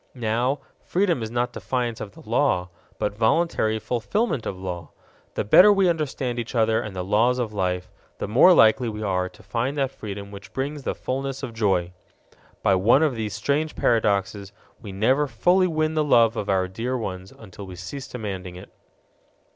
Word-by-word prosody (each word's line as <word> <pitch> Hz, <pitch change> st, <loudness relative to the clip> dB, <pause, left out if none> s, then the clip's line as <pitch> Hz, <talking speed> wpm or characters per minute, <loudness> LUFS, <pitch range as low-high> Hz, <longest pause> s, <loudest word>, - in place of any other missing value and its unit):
Now, 120 Hz, +4 st, 0 dB, 0.2 s
freedom 175 Hz, -7 st, +1 dB
is 110 Hz, -, -3 dB
not 120 Hz, +1 st, -1 dB
defiance 115 Hz, +2 st, -3 dB
of 100 Hz, -1 st, -9 dB
law, 110 Hz, -6 st, +1 dB, 0.3 s
but 105 Hz, -, -1 dB
voluntary 110 Hz, 0 st, +1 dB
fulfillment 125 Hz, -, -1 dB
of 95 Hz, -, -4 dB
law. 90 Hz, -3 st, -6 dB, 0.5 s
The -, -, 0 dB
better 180 Hz, -, +7 dB
we 195 Hz, -2 st, +3 dB
understand 135 Hz, -6 st, -2 dB
each 120 Hz, +2 st, -5 dB
other 110 Hz, -1 st, +2 dB
and 105 Hz, -3 st, -7 dB
the 90 Hz, -, -3 dB
laws 110 Hz, +6 st, +2 dB
of 115 Hz, -4 st, -2 dB
life, 90 Hz, -2 st, -2 dB, 0.3 s
the -, -, -4 dB
more 125 Hz, -, +6 dB
likely 120 Hz, -5 st, +5 dB
we 105 Hz, 0 st, -5 dB
are 90 Hz, -2 st, 0 dB
to -, -, -19 dB
find 120 Hz, +8 st, -2 dB
that 135 Hz, -2 st, 0 dB
freedom 100 Hz, -4 st, -7 dB
which 100 Hz, 0 st, -11 dB
brings 145 Hz, +2 st, -3 dB
the -, -, -3 dB
fullness 135 Hz, +1 st, -4 dB
of 125 Hz, -3 st, -5 dB
joy. 95 Hz, -5 st, 0 dB, 0.7 s
By 95 Hz, -, +4 dB
one 110 Hz, +10 st, +4 dB
of 150 Hz, -5 st, +1 dB
those 110 Hz, -2 st, -3 dB
strange 145 Hz, +8 st, -1 dB
paradoxes, 100 Hz, -3 st, 0 dB, 0.3 s
we 100 Hz, -, -8 dB
never 130 Hz, +9 st, +2 dB
fully 180 Hz, -, +3 dB
win 155 Hz, -2 st, 0 dB
the 155 Hz, -1 st, +1 dB
love 115 Hz, -5 st, +4 dB
of 105 Hz, -, -4 dB
our 95 Hz, -1 st, +2 dB
dear 120 Hz, +7 st, -3 dB
ones 95 Hz, -4 st, -6 dB
until 100 Hz, -2 st, -11 dB
we 90 Hz, -, -9 dB
cease 130 Hz, +10 st, -7 dB
demanding 95 Hz, -6 st, -6 dB
it. 90 Hz, -, -12 dB
115 Hz, 180 wpm, -24 LUFS, 100-135 Hz, 0.7 s, better